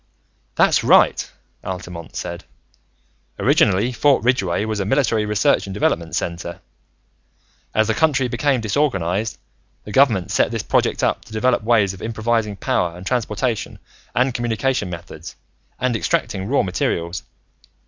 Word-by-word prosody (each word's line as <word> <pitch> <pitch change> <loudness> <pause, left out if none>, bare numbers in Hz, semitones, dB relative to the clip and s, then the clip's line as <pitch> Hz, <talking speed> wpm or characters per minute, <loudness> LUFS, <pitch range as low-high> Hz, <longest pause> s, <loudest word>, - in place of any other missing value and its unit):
"That's - - +3
right," - - +4 0.3
Altamont 90 -3 -7
said. - - -5 0.9
"Originally, 105 +7 +3
Fort 135 +2 +2
Ridgeway 105 -6 +1
was 110 -1 -2
a 100 - -1
military 115 -3 +1
research 105 -1 +2
and 95 - -6
development 85 -5 0
center. 85 0 -4 1.2
As 110 - +4
the 110 - +1
country 140 -4 +2
became 135 0 0
disorganized, 110 - 0 0.5
the 105 - -9
Government 110 -7 +3
set - - +2
this - - -3
project - - +1
up - - +1
to - - -17
develop 125 +3 +2
ways 110 -4 +3
of 95 - -12
improvising 110 -1 -1
power 90 -2 -1
and 90 - -10
transportation 115 0 -2 0.4
and 125 +1 +2
communication 120 -2 -1
methods 85 -2 -9 0.4
and 125 -2 0
extracting 95 -3 -1
raw 140 +4 +2
materials. 85 -1 -2
110 Hz, 135 wpm, -20 LUFS, 95-125 Hz, 1.2 s, right